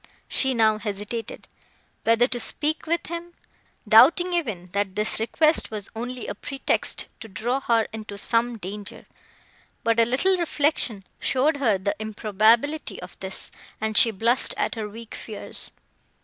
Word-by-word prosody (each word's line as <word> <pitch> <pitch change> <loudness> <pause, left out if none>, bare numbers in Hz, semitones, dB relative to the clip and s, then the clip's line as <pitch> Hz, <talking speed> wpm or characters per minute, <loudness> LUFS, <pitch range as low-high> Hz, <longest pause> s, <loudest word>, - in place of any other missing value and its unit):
She 265 -2 +1
now 220 -2 +3
hesitated, 210 +2 -5 0.6
whether 230 +2 +5
to 245 - -1
speak 310 +7 -2
with 335 +1 0
him, 340 +1 -7 0.5
doubting 315 - +6
even, 215 - -2
that 200 -1 -1
this 210 +1 0
request 305 +8 +3
was 210 -2 -5
only 245 +2 -5
a - - -3
pretext 270 +6 -1
to 225 - -9
draw 230 +7 -2
her 230 -4 +2
into 215 -2 -7
some 230 +3 +1
danger; 205 +1 -8 0.8
but 230 0 +2
a 230 - +6
little 275 +11 +2
reflection 290 - +1 0.2
showed 285 +4 +2
her 230 -8 +2
the 195 +2 -2
improbability 220 +7 +1
of 180 0 -10
this, 190 0 -5 0.3
and 220 0 -2
she 230 - +6
blushed 230 +4 +2
at - - 0
her 220 -3 -4
weak 225 +2 -10
fears. 215 -2 -6
230 Hz, 150 wpm, -24 LUFS, 210-270 Hz, 0.8 s, doubting